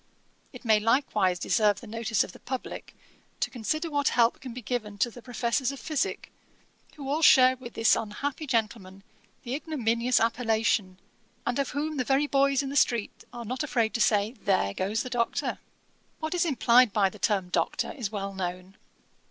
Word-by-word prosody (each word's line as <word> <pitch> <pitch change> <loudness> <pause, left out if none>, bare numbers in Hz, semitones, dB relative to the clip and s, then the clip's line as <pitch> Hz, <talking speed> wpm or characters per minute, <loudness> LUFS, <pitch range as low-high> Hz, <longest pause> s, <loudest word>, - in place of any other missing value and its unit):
It - - -12
may 220 -2 +5
likewise 215 -5 +2
deserve 205 +2 +2
the - - -12
notice 225 -1 0
of - - -8
the - - -15
publick 260 -1 -6 0.4
to - - -1
consider 310 +8 -2
what 285 -1 +1
help 235 -1 +3
can 260 - -7
be 245 +1 -8
given 210 -3 -3
to 240 +3 +1
the 245 - -12
professors 245 +2 -1
of 275 - -8
physick, 310 -4 -2 0.6
who 280 -3 -8
all 295 +4 0
share 255 -4 +7
with 250 -2 -11
this 225 0 +4
unhappy 285 +8 -4
gentleman 210 -5 -2 0.4
the 245 - -4
ignominious 250 -5 0
appellation, 225 -4 0 0.5
and 245 +2 -1
of 275 - 0
whom 300 +2 -3
the 255 - +1
very 270 +3 +2
boys 275 -1 +2
in 270 - -4
the - - -5
street 235 -7 +1
are 240 -1 -7
not 250 +4 -3
afraid 240 -7 0
to 230 - -1
say, 210 0 +3
There 195 - 0
goes 200 - -1
the 255 - -6
Doctor. 235 -2 -1 0.6
'What 315 +1 -3
is 355 -1 +1
implied 245 -4 +4
by 195 -1 +2
the 210 - -13
term 190 -2 0
Doctor - - -1
is 240 -10 -5
well 200 -2 -4
known. 185 0 -5
235 Hz, 185 wpm, -27 LUFS, 210-270 Hz, 0.6 s, share